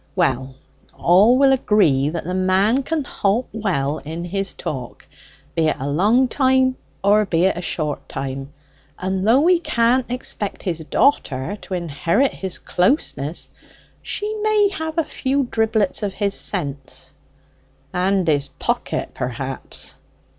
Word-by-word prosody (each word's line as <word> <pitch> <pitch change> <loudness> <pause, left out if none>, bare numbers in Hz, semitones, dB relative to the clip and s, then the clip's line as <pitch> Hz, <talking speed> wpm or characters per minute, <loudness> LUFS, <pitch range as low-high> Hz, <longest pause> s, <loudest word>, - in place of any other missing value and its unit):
"Well, 130 +1 0 0.4
all 205 +8 +5
will 270 0 +5
agree 160 - +3
that 165 +1 -4
the 180 - -4
man 190 +7 +2
can 310 +2 -2
halt 220 0 0
well 160 -9 -1
in 160 +3 -6
his 195 +2 -1
talk, 125 -4 -6 0.5
be 160 -1 +2
it - - +1
a 135 - -3
long 210 - +3
time 260 0 +2 0.3
or 205 +2 +5
be 175 -1 +2
it 190 - +2
a 175 - -4
short 155 -4 -3
time. 135 0 -5 0.5
And 190 +1 -2
though 250 +5 +5
we 350 +2 +4
can't 240 -4 +1
expect 240 -5 -3
his 170 -3 -2
daughter 160 - +1
to 190 - -5
inherit 170 - +1
his 190 -2 -4
closeness, 180 - 0 0.5
she 420 +1 -2
may 425 -1 +3
have 320 -4 -5
a 330 - +3
few 275 -1 -1
dribblets 220 -4 0
from 205 - -1
his 200 +1 -1
sense." 145 -11 -2 0.8
"And 185 0 +1
his 145 -3 +2
pocket, - - -3
perhaps." 130 +2 -4
195 Hz, 140 wpm, -21 LUFS, 155-250 Hz, 0.8 s, all